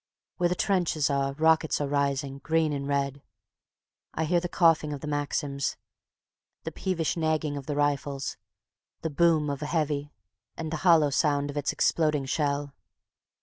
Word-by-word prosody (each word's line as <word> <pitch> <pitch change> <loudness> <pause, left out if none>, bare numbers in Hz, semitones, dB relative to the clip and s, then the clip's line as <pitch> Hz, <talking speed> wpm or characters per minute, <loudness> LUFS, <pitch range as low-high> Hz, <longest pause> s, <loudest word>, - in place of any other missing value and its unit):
Where 175 -1 +2
the 180 - 0
trenches 170 -7 +1
are, 140 0 0
rockets 160 +1 +2
are 145 - -1
rising, 140 -1 -1
green 160 +2 +1
and 140 -1 -3
red. 140 0 -1 0.9
I 160 - 0
hear 175 +2 +2
the 175 0 -4
coughing 165 -4 +3
of 140 - -6
the - - -6
Maxims, 145 -1 -2 0.9
the - - -4
peevish 175 -4 -1
nagging 155 -2 0
of 140 -2 -7
the 145 - -2
rifles, 145 -1 -1 0.7
the 160 - -2
boom 160 -1 +3
of 140 0 -3
a 150 - -3
"heavy" 150 -2 -1 0.5
and 160 -1 -4
the 160 - -1
hollow 160 -4 +4
sound 145 0 +1
of 145 - -8
its 145 - 0
exploding 150 -4 +1
shell. 145 0 -1
150 Hz, 160 wpm, -27 LUFS, 140-160 Hz, 0.9 s, hollow